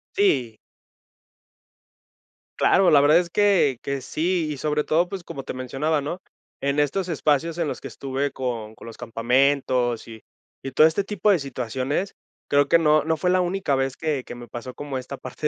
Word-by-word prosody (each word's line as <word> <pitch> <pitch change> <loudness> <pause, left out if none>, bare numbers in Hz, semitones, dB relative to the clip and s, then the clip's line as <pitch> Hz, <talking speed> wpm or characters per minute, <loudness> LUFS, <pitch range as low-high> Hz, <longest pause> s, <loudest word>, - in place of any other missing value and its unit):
Sí. 130 - +1 2.0
Claro, 190 -2 +4
la 145 - +7
verdad 150 +3 +6
es 175 -1 0
que 195 - +3
que 140 -1 -3
sí. 165 +4 -1
Y 145 - -5
sobre 150 +1 0
todo, 170 +3 +1
pues 190 -3 -6
como 135 -4 -7
te - - -6
mencionaba, 135 +4 -1
¿no?, 170 +6 -5 0.4
en 140 +1 0
estos 175 +6 0
espacios 160 +1 0
en 165 -3 0
los - - -5
que 135 - -6
estuve 135 +4 -3
con 115 -4 -4
con - - -13
los 115 - -10
campamentos 125 +1 +1
y 110 -1 -11 0.4
y 135 - -6
todo 155 - +6
este 165 +5 -1
tipo 210 0 -1
de 185 - +3
situaciones, 135 - -3 0.3
creo 145 0 +3
que - - +6
no, 155 -1 +4
no 160 0 0
fue 180 +4 0
la 185 0 +3
única 180 -5 0
vez 135 0 -1
que 150 -5 -2
que - - -9
me 120 0 -10
pasó 120 +1 -8
como 145 -2 -5
esta 130 +2 -8
parte 130 +4 -4
145 Hz, 190 wpm, -24 LUFS, 130-165 Hz, 2.0 s, la